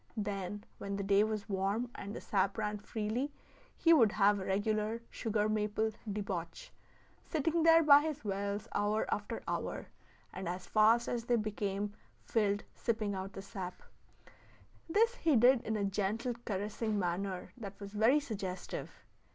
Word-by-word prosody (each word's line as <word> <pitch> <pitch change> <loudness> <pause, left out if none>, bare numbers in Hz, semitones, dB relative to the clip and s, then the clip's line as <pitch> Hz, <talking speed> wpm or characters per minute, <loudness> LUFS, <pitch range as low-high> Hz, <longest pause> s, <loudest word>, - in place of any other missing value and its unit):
Then, 205 -1 -3 0.2
when 200 0 -3
the 200 - -2
day 200 +1 +4
was 215 -2 -2
warm, 200 +5 -1
and 200 +1 -7
the - - -6
sap 195 0 0
ran 210 -1 -2
freely, 220 +6 -2 0.5
he 335 - +5
would 230 -9 +5
have 205 -1 +4
a 190 - -5
regular 215 +3 0
sugar 215 -2 0
maple 215 +1 0 0.2
debauch, 200 - -4 0.5
sitting 325 +2 0
there 330 0 +7
by 290 -1 +8
his 300 -5 -4
wells 200 +1 -2
hour 205 +1 +1
after 210 +2 -4
hour, - - -3 0.4
and 190 -2 -4
as 180 +1 -4
fast 225 +4 +4
as 235 -1 -2
they 240 - +3
became 205 -2 -2 0.3
filled 205 -2 +1
sipping 220 -3 -1
out 190 0 -5
the 195 - -7
sap. 190 -3 -7 1.1
This 455 +7 +4
he 320 -4 +3
did 245 +1 +6
in 220 0 -2
a 200 - 0
gentle, 210 +5 -1
caressing 210 +2 -2
manner 185 0 -2
that 200 -5 -8
was 200 0 -8
very 225 +8 +4
suggestive. 195 -9 -6
210 Hz, 155 wpm, -33 LUFS, 200-230 Hz, 1.1 s, by